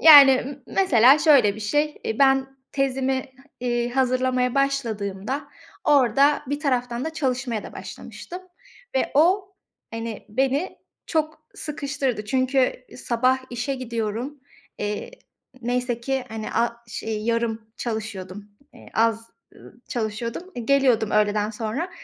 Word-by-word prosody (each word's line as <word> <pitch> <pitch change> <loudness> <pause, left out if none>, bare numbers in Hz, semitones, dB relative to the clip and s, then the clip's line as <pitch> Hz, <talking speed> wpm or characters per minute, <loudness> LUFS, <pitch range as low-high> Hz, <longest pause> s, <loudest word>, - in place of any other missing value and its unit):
Yani 285 -4 +10
m 270 +2 -2
mesela 275 - +5
şöyle 275 -10 +5
bir 215 - -9
şey. 295 +8 0
E, 220 - -2
ben 270 -1 +3 0.2
tezimi, 265 -1 0 0.3
iii, 240 -1 0
hazırlamaya 255 -1 +1
başladığımda 245 -3 -1 0.4
orada 280 0 +4
bir 285 +3 -2
taraftan 250 -4 -1
da 320 - -3
çalışmaya 255 -7 -1
da - - -9
başlamıştım 360 +1 -9 0.5
ve - - +1
o 380 +6 +3 0.4
hani 225 -1 -6
beni 270 - 0 0.3
çok 310 -1 -2
sıkıştırdı. 275 -6 -3
Çünkü 255 +2 +1
sabah 255 +1 +1
işe 245 +3 -2
gidiyorum. 235 +2 -4 0.4
Eee, 210 0 -3 0.5
neyse 245 0 -1
ki 265 +1 -1
hani 220 -1 -5
a 235 0 +1
ş 220 - -6
ııı, 220 - -1
yarım 225 0 -1
çalışıyordum. 205 -4 -5 0.3
Eee, - - -14
az, 225 0 +1 0.2
ııı, 240 - -16
çalışıyordum. 235 - -4
I 235 -2 -6
geliyordum 255 -6 +3
öğleden 210 0 +2
sonra, 225 - -3
250 Hz, 125 wpm, -24 LUFS, 225-275 Hz, 0.5 s, Yani